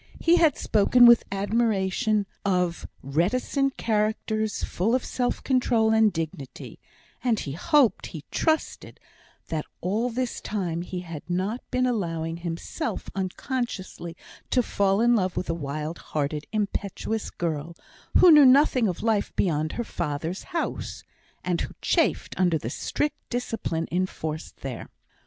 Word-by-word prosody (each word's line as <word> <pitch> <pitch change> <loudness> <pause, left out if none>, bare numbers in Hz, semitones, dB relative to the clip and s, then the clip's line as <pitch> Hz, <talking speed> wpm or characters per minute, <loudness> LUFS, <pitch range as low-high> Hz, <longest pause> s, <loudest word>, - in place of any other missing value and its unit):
He 340 +1 +4
had 320 -5 +4
spoken 230 +4 +5
with 235 -1 +8
admiration 205 +1 +1 0.2
of 180 -3 0 0.2
reticent 250 - 0
characters, 215 0 0
full 220 +7 +1
of 255 - -1
self 245 -1 -1
control 240 -4 +2
and 220 -1 +5
dignity; 160 -5 -6 0.4
and 235 -4 +2
he 140 - -4
hoped 280 - +2
he 155 -4 -8
trusted, 315 -1 -1 0.5
that 155 -2 -3
all 215 +7 0
this 250 0 -3
time 175 -5 -2
he 180 0 -5
had 165 -4 -7
not 190 +7 -1
been 255 0 +1
allowing 165 -9 -1
himself 170 - -4
unconsciously 190 -3 -4 0.3
to 250 - +3
fall 200 -1 +1
in 240 +1 +5
love 185 -4 0
with 180 - -1
a - - 0
wild 155 +1 -4
hearted, 150 0 -3
impetuous 210 +1 -2
girl, 165 -1 -3 0.4
who 360 - +8
knew 300 -2 +9
nothing 260 -3 +5
of 180 - -3
life 220 -3 +1
beyond 155 -4 0
her 240 - -2
father's 160 -1 -4
house, 345 -2 -4 0.4
and 180 -2 0
who - - -5
chafed - - +1
under 175 -3 +3
the 120 -5 -5
strict 295 - -2
discipline 225 -9 -2
enforced 165 -3 -3
there. 130 -4 -6
200 Hz, 140 wpm, -26 LUFS, 170-240 Hz, 0.5 s, knew